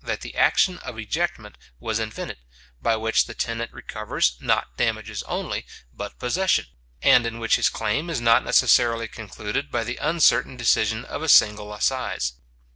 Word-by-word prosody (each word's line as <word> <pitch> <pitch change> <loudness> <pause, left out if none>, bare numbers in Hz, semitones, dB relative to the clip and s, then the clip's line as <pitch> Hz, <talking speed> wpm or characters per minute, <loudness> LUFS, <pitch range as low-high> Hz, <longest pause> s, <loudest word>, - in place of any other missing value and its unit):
that - - -3
the - - -8
action 180 -1 +3
of 110 - -8
ejectment 110 - -3 0.3
was 110 +6 -2
invented, 110 - -5 0.4
by 115 - +2
which 110 0 +1
the 115 - -9
tenant 115 0 -3
recovers, 105 - -2
not - - 0
damages - - -2
only, - - -3 0.3
but - - -7
possession, 185 +10 +1 0.4
and 125 - +6
in 115 0 -5
which 115 -1 +2
his - - +2
claim 135 +10 -2
is 165 - -1
not 115 +1 +4
necessarily 115 -2 +3
concluded 70 - -5
by 115 - -1
the 120 +2 -4
uncertain 150 -5 +2
decision 110 -1 +1
of - - -6
a 160 - -2
single 105 -4 +5
assize. 105 - -1
115 Hz, 160 wpm, -24 LUFS, 110-130 Hz, 0.4 s, and